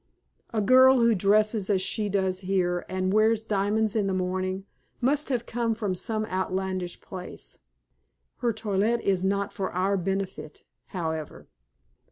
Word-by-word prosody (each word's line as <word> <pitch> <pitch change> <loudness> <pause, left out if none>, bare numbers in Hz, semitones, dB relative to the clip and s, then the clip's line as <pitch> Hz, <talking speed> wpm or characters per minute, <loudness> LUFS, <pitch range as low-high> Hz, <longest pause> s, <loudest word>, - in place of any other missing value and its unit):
A 220 -3 0
girl 260 +4 +6
who 230 0 +5
dresses 210 +1 +2
as 195 -2 +3
she 210 +2 -1
does 190 -2 0
here, 180 -2 -1
and 185 0 -1
wears 220 +1 +3
diamonds 210 +1 0
in 210 -3 +1
the 190 - 0
morning, 185 +1 -2 0.3
must 285 +4 +1
have 240 -3 -1
come 230 -1 -1
from 210 -4 -2
some 215 +4 -2
outlandish 185 -2 -3
place. 185 -1 -8 0.8
Her 240 -2 0
toilette 220 +1 0
is 190 -2 +1
not 200 +1 0
for 190 -1 -3
our 190 +2 +1
benefit, 190 -4 -4 0.2
however." 160 -4 -5
195 Hz, 145 wpm, -26 LUFS, 185-220 Hz, 0.8 s, girl